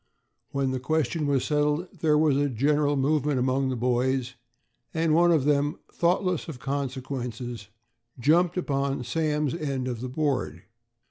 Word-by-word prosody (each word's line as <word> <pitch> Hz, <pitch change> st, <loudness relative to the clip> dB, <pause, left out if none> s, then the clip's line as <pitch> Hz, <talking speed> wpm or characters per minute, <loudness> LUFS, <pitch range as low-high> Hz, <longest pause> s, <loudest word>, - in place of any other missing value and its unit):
When 135 Hz, -1 st, -1 dB
the 130 Hz, -, -2 dB
question 155 Hz, +3 st, 0 dB
was 140 Hz, -3 st, +1 dB
settled, 150 Hz, +3 st, 0 dB
there 150 Hz, -1 st, +3 dB
was 150 Hz, -2 st, +3 dB
a 145 Hz, +1 st, +1 dB
general 145 Hz, +4 st, +2 dB
movement 145 Hz, 0 st, +1 dB
among 130 Hz, +1 st, +1 dB
the 130 Hz, -, -1 dB
boys, 125 Hz, +1 st, 0 dB, 0.6 s
and 160 Hz, -1 st, +2 dB
one 175 Hz, +2 st, +5 dB
of 155 Hz, -5 st, +3 dB
them, 145 Hz, 0 st, +2 dB, 0.2 s
thoughtless 180 Hz, 0 st, +1 dB
of 160 Hz, -6 st, -6 dB
consequences, 130 Hz, -4 st, -4 dB, 0.5 s
jumped 170 Hz, +7 st, +3 dB
upon 140 Hz, -6 st, -1 dB
Sam's 150 Hz, 0 st, 0 dB
end 140 Hz, -6 st, -2 dB
of 120 Hz, -3 st, -4 dB
the 130 Hz, -, -4 dB
board. 130 Hz, -, -1 dB
140 Hz, 145 wpm, -26 LUFS, 130-155 Hz, 0.6 s, one